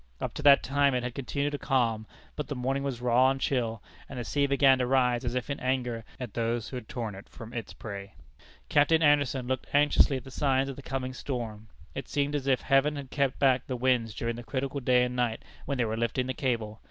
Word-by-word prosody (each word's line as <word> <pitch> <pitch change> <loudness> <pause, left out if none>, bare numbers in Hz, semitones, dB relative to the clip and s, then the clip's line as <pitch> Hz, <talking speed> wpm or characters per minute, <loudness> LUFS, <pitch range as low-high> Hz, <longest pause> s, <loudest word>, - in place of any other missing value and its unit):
Up - - -3
to - - -6
that 140 -1 +7
time 140 0 +2
it 125 - -1
had 125 -1 -3
continued 140 +2 -2
calm, 115 -5 +1 0.3
but 150 - -4
the 145 - -4
morning 135 +2 -1
was 135 -4 -3
raw 125 +1 +4
and 135 0 -1
chill, 115 -5 -1 0.3
and 140 - -7
the 120 - -3
sea 140 +4 +1
began 135 -1 +5
to 125 - +1
rise 125 -1 +2
as 120 0 -2
if 125 - -2
in 140 - -3
anger 125 -3 -1 0.2
at 125 -6 -6
those 115 0 -1
who - - -7
had 120 - -9
torn 115 -4 -4 0.2
from 115 -1 -11
it 120 - -1
its - - -10
prey. 100 -2 -8 0.5
Captain 160 - +4
Anderson 140 -4 +3
looked 130 0 -2
anxiously 145 -1 +4
at 130 - -8
the 135 - -11
signs 135 0 +1
of 135 - -5
the 140 - -9
coming 130 -1 -4
storm. 115 -5 -5 0.3
It - - -6
seemed 145 0 0
as 140 -2 -2
if 130 -2 +3
Heaven 135 +2 +3
had 140 -2 -7
kept 140 -3 0
back 130 -2 +3
the 130 - -2
winds 120 -4 +1
during 115 0 -2
the 120 - -7
critical 135 +2 -3
day 125 -1 +3
and 125 0 -2
night 120 -2 -1 0.2
when 140 - -1
they 120 - +2
were 110 0 -2
lifting 115 +2 -1
the 130 - -2
cable! 115 -5 -2
130 Hz, 240 wpm, -28 LUFS, 120-140 Hz, 0.5 s, that